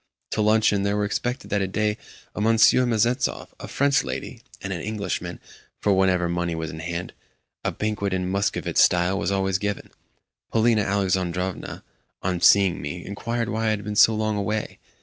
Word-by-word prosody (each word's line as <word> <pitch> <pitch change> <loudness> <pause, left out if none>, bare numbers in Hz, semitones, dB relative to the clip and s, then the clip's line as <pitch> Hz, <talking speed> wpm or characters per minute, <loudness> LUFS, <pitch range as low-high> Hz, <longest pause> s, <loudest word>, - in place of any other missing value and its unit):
To - - 0
luncheon 105 -1 +3
there 100 +1 0
were 105 - +1
expected 125 +5 -3
that 100 -2 0
day 105 +1 0 0.4
a - - -4
Monsieur 115 +3 +5
Mezentsov, 120 +3 0
a - - -7
French 140 -2 +2
lady, 65 -1 -6 0.2
and 95 +1 -4
an 85 - -5
Englishman; 100 -5 -4 0.4
for, 100 - +2
whenever 95 -2 +2
money 85 -1 -1
was 80 -2 -4
in 80 - -8
hand, 85 +2 -5 0.5
a - - 0
banquet 105 -2 -2
in 90 -1 -1
Muscovite 100 +2 -1
style 90 +2 +3
was 85 - -1
always 95 -1 0
given. 105 0 -4 0.6
Polina 115 -1 +3
Alexandrovna, 95 -2 -2 0.4
on 90 -2 -1
seeing 95 -6 +5
me, 80 +5 -6
inquired 115 +3 -3
why 110 0 -1
I 110 - +2
had 105 - -8
been 105 0 -4
so 110 +2 +6
long 110 -1 -1
away. 105 +2 -3
100 Hz, 170 wpm, -24 LUFS, 90-110 Hz, 0.6 s, so